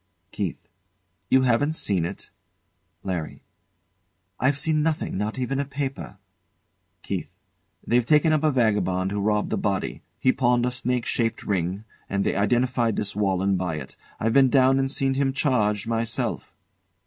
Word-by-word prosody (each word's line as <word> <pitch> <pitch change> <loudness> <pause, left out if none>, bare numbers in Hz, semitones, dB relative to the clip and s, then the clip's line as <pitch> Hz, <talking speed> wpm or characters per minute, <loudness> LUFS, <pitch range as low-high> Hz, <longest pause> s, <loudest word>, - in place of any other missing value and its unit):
KEITH. 100 -5 -3 0.7
You 130 0 +5
haven't 130 +5 +2
seen 95 - 0
it? - - -7 0.7
LARRY. 90 -5 -4 1.0
I've 140 +2 +2
seen 155 +1 +1
nothing, 155 0 -1
not 105 +4 -2
even 130 +2 -1
a - - +1
paper. 140 -6 -5 0.9
KEITH. - - -3 0.6
They've 120 +1 +3
taken 150 +5 +4
up 155 - +2
a 155 - +3
vagabond 100 -7 +1
who 100 0 -2
robbed 105 +1 0
the - - 0
body. 100 -2 -2 0.2
He 130 - +3
pawned 125 -2 +2
a 125 - 0
snake 125 -1 -1
shaped 115 -2 -1
ring, 95 +1 -1 0.3
and 100 0 0
they - - 0
identified 120 +2 +1
this 105 - -3
Walenn 95 -1 +1
by 90 -3 -2
it. 70 -4 -8 0.2
I've 115 +1 0
been 135 0 +6
down 135 0 +4
and 135 0 +1
seen 135 -1 0
him 135 0 0
charged 110 -8 +1
myself. 115 0 -2
120 Hz, 155 wpm, -25 LUFS, 100-135 Hz, 1.0 s, been